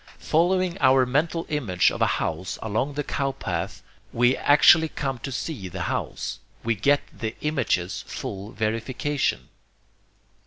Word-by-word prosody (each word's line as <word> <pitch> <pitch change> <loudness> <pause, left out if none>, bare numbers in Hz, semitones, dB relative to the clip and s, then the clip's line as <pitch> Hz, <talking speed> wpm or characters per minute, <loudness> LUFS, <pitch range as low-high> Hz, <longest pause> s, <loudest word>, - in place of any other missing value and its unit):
Following 180 +2 +1
our 130 0 +5
mental 160 +6 0
image 115 -13 +2
of - - -6
a - - +5
house 90 +4 -3
along 115 +6 -1
the 145 - -1
cow 135 -1 -1
path, 135 - -4 0.3
we 120 +2 +3
actually 160 +2 +6
come 135 -5 -3
to 135 - -6
see 130 - -4
the 90 - -5
house; - - -3 0.2
we 115 - +1
get 140 +8 +2
the 110 0 -4
image's 120 - 0
full 100 +2 -6
verification. 115 - -1
130 Hz, 140 wpm, -25 LUFS, 110-150 Hz, 0.3 s, actually